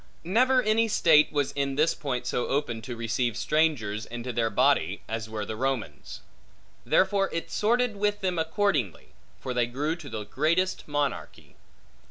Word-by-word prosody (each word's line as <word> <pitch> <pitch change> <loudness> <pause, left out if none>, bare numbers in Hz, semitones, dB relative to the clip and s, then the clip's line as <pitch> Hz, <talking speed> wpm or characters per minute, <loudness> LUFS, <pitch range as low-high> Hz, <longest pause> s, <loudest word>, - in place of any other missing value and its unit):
Never 250 +8 +3
any 220 +1 +2
state 160 -8 +4
was 145 -2 0
in 140 -1 -2
this 155 +3 +3
point 125 -4 -4
so 120 0 -1
open 130 -5 -1
to 120 +1 -6
receive 115 0 -1
strangers 120 -9 0
into 120 +1 -6
their 115 -1 +1
body, 105 - +1
as 110 0 -4
were 110 -1 -4
the 110 - -5
Romans. 120 - -4 0.6
Therefore 195 0 +2
it 165 - -4
sorted 235 +1 +1
with 205 0 0
them 180 -3 -1
accordingly; 160 - -1 0.3
for 130 - -4
they 120 -1 +1
grew 145 +6 -2
to 155 -5 -10
the 110 -3 -5
greatest 165 - 0
monarchy. 145 -1 -3
145 Hz, 160 wpm, -27 LUFS, 120-185 Hz, 0.6 s, state